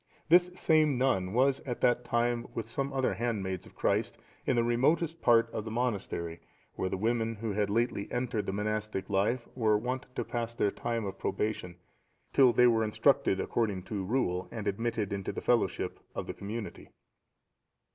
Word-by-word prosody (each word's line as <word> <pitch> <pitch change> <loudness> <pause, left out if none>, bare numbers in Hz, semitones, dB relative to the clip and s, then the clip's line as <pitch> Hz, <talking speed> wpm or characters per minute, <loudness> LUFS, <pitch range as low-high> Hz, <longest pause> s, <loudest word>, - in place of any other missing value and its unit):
This 175 +2 +6
same 155 -6 +3
nun 95 -8 +1
was 130 +4 +3
at 120 -3 -5
that 125 0 +3
time 120 0 0
with 115 - -2
some 135 +4 -2
other 135 -1 +1
handmaids 100 -6 -2
of - - -18
Christ, - - 0 0.3
in 130 - +3
the 120 - +3
remotest 155 +8 +1
part 115 -1 +5
of 110 - -3
the 110 - -6
monastery, 100 -8 -2 0.3
where 95 - -2
the - - -2
women 115 +2 0
who 110 +1 -3
had 105 0 0
lately 115 -1 0
entered 120 -3 -1
the - - 0
monastic 105 0 -2
life 105 +5 +1
were 110 -4 +3
wont 125 +4 -3
to - - -2
pass 115 -1 -3
their 100 - +1
time 115 -2 -2
of 95 - -6
probation, 95 -3 -2 0.6
till 130 -3 +6
they 125 +1 +5
were 115 -2 +4
instructed 110 -2 +2
according 105 -5 -1
to 100 0 -4
rule, 95 -4 0
and 110 -3 -5
admitted 110 0 -1
into 100 -1 -3
the - - -5
fellowship - - 0 0.2
of - - -3
the - - -5
community. 105 +2 -6
115 Hz, 175 wpm, -30 LUFS, 100-125 Hz, 0.6 s, This